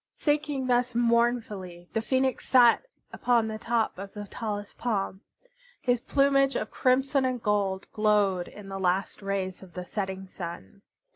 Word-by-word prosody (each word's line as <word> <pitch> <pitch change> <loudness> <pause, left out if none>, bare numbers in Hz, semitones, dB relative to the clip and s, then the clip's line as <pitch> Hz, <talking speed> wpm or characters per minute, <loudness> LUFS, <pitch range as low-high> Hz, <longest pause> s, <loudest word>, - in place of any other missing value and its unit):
Thinking 295 -3 0
thus 245 -1 +1
mournfully, 230 -7 0
the 225 - +1
Phoenix 260 +2 0
sat 245 - +6 0.3
upon 235 -2 +2
the 215 0 -5
top 225 -5 0
of 195 0 -7
the 205 0 -5
tallest 205 -1 -5
palm. 195 -5 -1 0.6
His 245 -2 +1
plumage 275 +1 +3
of 215 - -2
crimson 270 +2 +2
and 255 -1 0
gold 200 -3 0
glowed 205 -4 +2
in 205 -1 -11
the 195 0 -5
last 190 +2 0
rays 195 -2 -3
of 185 -3 -14
the 180 0 -5
setting 190 -1 -4
sun. 175 +2 -8
215 Hz, 150 wpm, -28 LUFS, 195-250 Hz, 0.6 s, sat